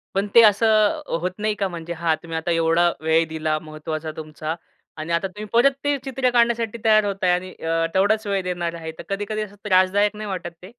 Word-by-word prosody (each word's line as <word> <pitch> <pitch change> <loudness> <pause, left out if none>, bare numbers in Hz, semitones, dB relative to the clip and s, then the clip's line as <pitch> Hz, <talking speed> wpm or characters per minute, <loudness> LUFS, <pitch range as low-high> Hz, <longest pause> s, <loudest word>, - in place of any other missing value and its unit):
पण 200 +1 +1
ते 235 - +10
असं 215 +4 +4 0.2
होत 180 +2 -2
नाही 215 0 0
का 200 -1 -1
म्हणजे 170 -1 -6
हां 165 -1 0
तुम्ही 165 -1 -5
आता 160 +2 -2
एवढा 165 +1 +3
वेळ 160 +1 +3
दिला 155 -1 -1
महत्वाचा 155 0 -5
तुमचा 155 0 -5 0.4
आणि 155 +2 -5
आता 170 +3 +1
तुम्ही 210 +3 -8
परत 255 +4 +5
ते 290 0 +1
चित्र 265 -1 0
काढण्यासाठी 235 -2 +1
तयार 215 -1 +5
होताय 195 -3 0
आणि 180 +1 -1
अ, 165 0 -1
तेवढाच 215 +3 +2
वेळ 195 -1 0
देणार 175 -2 -3
आहे. 160 -1 -6
तर - - -8
कधी-कधी 205 +2 -3
असं 205 -1 -7
त्रासदायक 200 +2 +3
नाही 215 0 -6
वाटत 180 -2 -4
ते? 185 - -11
185 Hz, 205 wpm, -22 LUFS, 165-215 Hz, 0.4 s, ते